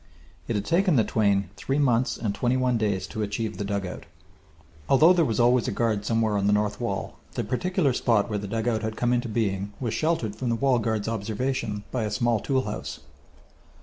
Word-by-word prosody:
It 115 - -1
had 100 0 -1
taken 180 0 +3
the 115 - +4
twain 100 -4 +1
three 135 +7 -1
months 125 -4 +2
and 105 -4 -2
twenty 120 +5 +1
one 130 -1 +1
days 105 -4 0
to 110 - -5
achieve 105 +1 -3
the - - -1
dugout. 100 -2 -4 0.8
Although 155 +6 +7
there 175 -2 +3
was 115 -6 -1
always 120 0 +4
a - - 0
guard 110 -3 0
somewhere 110 -2 +1
on 100 - 0
the 105 - +4
north 105 +1 0
wall, 100 -5 -3 0.2
the - - -2
particular 150 - 0
spot 115 -4 +2
where 105 -2 -2
the 100 - -5
dugout 110 +1 -1
had 110 -1 -3
come 120 0 +1
into 120 0 0
being 100 -3 -1
was 120 -4 -2
sheltered 155 -10 0
from 125 - -3
the 115 - +1
wall 130 0 +2
guard's 110 -2 -1
observation 110 0 -2
by 125 - -1
a 105 - -1
small 115 +2 +1
tool 130 +3 0
house. 105 -2 -5
115 Hz, 210 wpm, -26 LUFS, 105-125 Hz, 0.8 s, Although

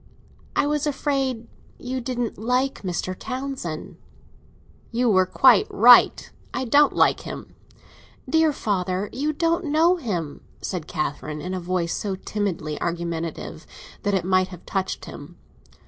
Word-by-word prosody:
"I - - +3
was 300 0 0
afraid 270 -5 -1 0.3
you 255 +1 -4
didn't 245 -3 -3
like 250 +4 0
Mr. 185 -1 -3
Townsend." 255 - -5 0.9
"You 240 0 +2
were 185 -2 +4
quite 245 +1 +5
right. 240 +3 +6 0.3
I 260 - -1
don't 285 +5 +5
like - - +4
him." - - -8 0.7
"Dear 320 -1 +3
father, 195 -6 -2
you 290 +5 0
don't 335 +3 0
know 320 +4 +3
him," 175 - -4 0.2
said 175 -5 -4
Catherine, 150 0 -3
in 180 +4 -5
a 185 - -2
voice 175 -1 -1
so 200 -2 -2
timidly 185 -6 -3
argumentative 170 -1 -4 0.3
that 205 -1 0
it 180 -3 0
might 185 0 +3
have 180 -2 -12
touched 190 -1 -3
him. - - -10
210 Hz, 135 wpm, -24 LUFS, 180-265 Hz, 0.9 s, right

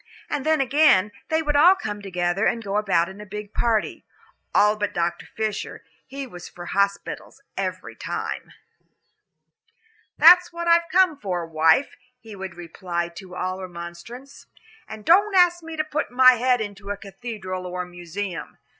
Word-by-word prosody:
And 290 -2 -1
then 315 0 +2
again, 260 -8 +4 0.2
they 320 0 +1
would 295 -1 -1
all 345 +6 +7
come 210 - -5
together 180 +1 0
and 230 - -1
go 200 0 -2
about 195 -5 +2
in 190 +3 -10
a - - -7
big 210 0 -8
party. 225 -3 0 0.5
All 210 +1 +4
but 205 -1 -3
Dr. 170 0 -2
Fisher 215 -2 -4 0.2
he 275 0 -6
was 180 -8 -10
for 175 - -10
hospitals 200 +1 -2 0.2
every - - -4
time. - - -5 1.7
"That's 350 +2 +7
what 340 0 -5
I've 335 0 +4
come 365 -5 +3
for, 180 -6 -3
wife," 160 - +2 0.2
he 225 -4 -11
would 190 -2 -7
reply 175 0 -4
to 180 +1 -11
all 185 +1 -3
remonstrance, 180 +9 -10 0.4
"and 215 -1 -10
don't 400 +4 +4
ask 350 -1 +5
me 325 -1 -8
to 310 - +1
put 305 0 -3
my 255 +1 +7
head 250 0 +1
into 200 -1 -7
a 205 - -3
cathedral 195 -2 -7
or 180 0 -4
a - - -11
museum." 175 -1 -6
210 Hz, 165 wpm, -23 LUFS, 180-275 Hz, 1.7 s, all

